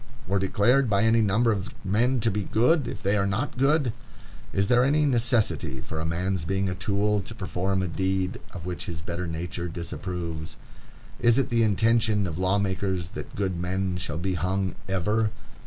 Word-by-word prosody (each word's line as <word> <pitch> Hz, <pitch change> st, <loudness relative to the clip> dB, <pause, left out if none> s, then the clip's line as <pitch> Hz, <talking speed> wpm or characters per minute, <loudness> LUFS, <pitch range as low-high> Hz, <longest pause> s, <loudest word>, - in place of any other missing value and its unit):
or 100 Hz, +1 st, +1 dB
declared 115 Hz, +7 st, +3 dB
by 100 Hz, 0 st, +3 dB
any 115 Hz, 0 st, +4 dB
number 110 Hz, +3 st, +3 dB
of 100 Hz, 0 st, -2 dB, 0.2 s
men 120 Hz, +7 st, +2 dB
to 115 Hz, 0 st, +1 dB
be 105 Hz, 0 st, -2 dB
good, 125 Hz, +4 st, +3 dB
if -, -, -6 dB
they 100 Hz, +2 st, +2 dB
are 100 Hz, -1 st, +2 dB
not 105 Hz, +9 st, -2 dB
good? 135 Hz, -1 st, +2 dB, 0.6 s
Is 100 Hz, 0 st, +1 dB
there 125 Hz, +2 st, +4 dB
any 150 Hz, +3 st, +3 dB
necessity 115 Hz, -, +1 dB
for 80 Hz, +5 st, -6 dB
a 80 Hz, -, -2 dB
man's 90 Hz, +1 st, -1 dB
being 95 Hz, +3 st, 0 dB
a 90 Hz, -, -1 dB
tool 100 Hz, +2 st, +1 dB
to 110 Hz, +4 st, -9 dB
perform 95 Hz, -1 st, -1 dB
a -, -, -1 dB
deed 95 Hz, +2 st, -1 dB
of 85 Hz, -3 st, -8 dB
which 90 Hz, +3 st, -4 dB
his 85 Hz, -3 st, -4 dB
better 85 Hz, +1 st, -4 dB
nature 85 Hz, +2 st, -4 dB
disapproves? 85 Hz, -1 st, -5 dB, 0.6 s
Is 120 Hz, 0 st, +4 dB
it 135 Hz, -, +1 dB
the 115 Hz, -1 st, +2 dB
intention 110 Hz, 0 st, +3 dB
of 85 Hz, -2 st, -4 dB
law 95 Hz, +2 st, +2 dB
makers 95 Hz, -3 st, -1 dB
that -, -, -8 dB
good 95 Hz, -3 st, -1 dB
men 90 Hz, 0 st, -1 dB
shall 85 Hz, -3 st, -3 dB
be 95 Hz, +2 st, -1 dB
hung 95 Hz, +1 st, -1 dB, 0.2 s
ever? 105 Hz, +4 st, +1 dB
95 Hz, 190 wpm, -26 LUFS, 90-110 Hz, 0.6 s, any